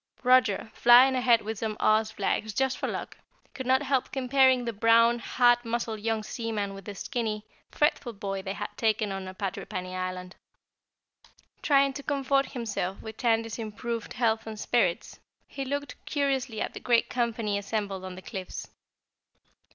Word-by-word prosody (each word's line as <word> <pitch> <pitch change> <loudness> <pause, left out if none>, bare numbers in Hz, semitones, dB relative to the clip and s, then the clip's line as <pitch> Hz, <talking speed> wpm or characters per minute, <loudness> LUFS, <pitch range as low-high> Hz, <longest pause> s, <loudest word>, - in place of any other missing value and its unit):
Roger, 245 -4 +3
flying 245 +4 +7
ahead 250 -3 +3
with 220 0 -4
some 215 -1 -3
Oz 215 0 +3
flags 210 0 -2
just 265 -1 0
for - - -1
luck, - - -5 0.3
could 260 -2 -6
not 260 +2 +3
help 265 -2 0
comparing 260 -1 +3
the 235 - -2
brown, 230 +2 +4
hard 240 0 +3
muscled 230 -2 -2
young 220 0 -1
seaman 215 -4 -3
with 195 -1 -10
the 205 - -7
skinny, 220 -3 -3 0.2
fretful 295 -4 +1
boy 195 -2 -4
they 190 0 -4
had - - -6
taken 215 -2 +1
on 195 -1 -5
at 185 0 -9
Patrippany 185 -1 -4
Island. 185 0 -5 1.3
Trying 275 -1 +3
to 280 - -6
comfort 275 -1 0
himself 205 -6 -3
with 220 -1 -8
Tandy's 225 -1 0
improved 230 +1 -4
health 225 -2 0
and 215 -1 -6
spirits, 190 -9 0 0.3
he 275 - -5
looked 285 -1 -5
curiously 270 -6 -1
at - - -2
the - - -7
great 240 -2 +2
company 230 -4 -1
assembled 200 -2 -3
on 185 -1 -7
the 185 - -11
cliffs. 185 -2 -7
225 Hz, 160 wpm, -28 LUFS, 205-255 Hz, 1.3 s, flying